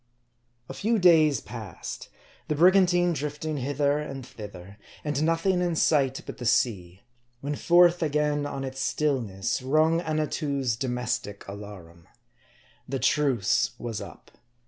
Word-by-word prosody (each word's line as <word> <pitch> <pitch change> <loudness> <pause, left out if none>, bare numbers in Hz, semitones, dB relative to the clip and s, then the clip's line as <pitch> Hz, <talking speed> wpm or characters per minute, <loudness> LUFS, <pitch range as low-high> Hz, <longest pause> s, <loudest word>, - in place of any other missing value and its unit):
A - - -7
FEW 225 +2 0
days 160 -7 +5
passed: 110 -6 -8 0.4
the 150 - -1
brigantine 175 +1 +4
drifting 150 +1 -4
hither 140 +2 0
and 135 -4 -6
thither, 105 -5 -11 0.2
and 145 -1 -1
nothing 165 +3 +1
in 175 -2 0
sight 135 -4 +2
but - - -8
the 120 - -5
sea, 95 -6 0 0.4
when 145 +1 -3
forth 175 +2 +4
again 150 -1 0
on 140 -1 -5
its 135 0 -5
stillness 120 -6 -1
rung 155 +5 +2
Annatoo's 150 -6 -1
domestic 125 -4 -3
alarum. 100 -5 -10 0.8
The 135 - -1
truce 135 - +1
was 115 -3 -5
up. - - -12
140 Hz, 125 wpm, -26 LUFS, 120-155 Hz, 0.8 s, days